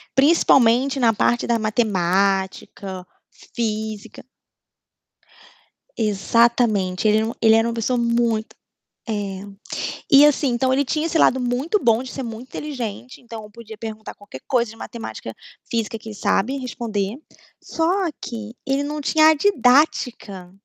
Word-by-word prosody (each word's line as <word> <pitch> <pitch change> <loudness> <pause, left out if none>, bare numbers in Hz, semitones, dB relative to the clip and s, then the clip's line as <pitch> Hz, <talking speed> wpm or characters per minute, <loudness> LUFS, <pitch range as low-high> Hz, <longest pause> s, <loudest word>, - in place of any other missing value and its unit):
Principalmente 270 -3 +4
na 230 -3 +4
parte 240 +3 +1
da 235 -1 +1
matemática, 195 -2 -1 0.5
física. 220 -2 -4 1.7
Exatamente. 215 -2 +1
Ele 215 0 +4
era 220 - +1
uma 230 - -5
ele 220 -1 +6
era 225 +1 +3
uma 235 - -2
pessoa 235 +2 -1
muito 235 -2 0 0.5
é, 200 -3 -3 0.7
e 280 +1 +8
assim, 295 -1 +3
então, 255 +2 +1
ele 280 +2 +2
tinha 305 +4 -1
esse 330 0 0
lado 260 -4 +4
muito 255 - 0
bom 230 -1 +3
de 255 0 -7
ser 270 - -5
muito 230 0 -7
inteligente, 255 -5 -6
então, 225 -3 -10
podia 220 0 -11
perguntar 220 -1 -8
qualquer 205 -11 -12
coisa 235 -4 +1
de 225 - -13
matemática, 230 0 -8 0.3
física, 225 -1 -2
que 220 - -10
ele - - -8
sabe 245 +6 0
responder, 230 -5 -3 0.4
só 325 - -2 0.4
que 225 -1 -7
ele 275 +1 0
não 300 +1 -4
tinha 310 +2 +3
a 315 - +4
didática. 250 - +1
230 Hz, 140 wpm, -21 LUFS, 215-260 Hz, 1.7 s, e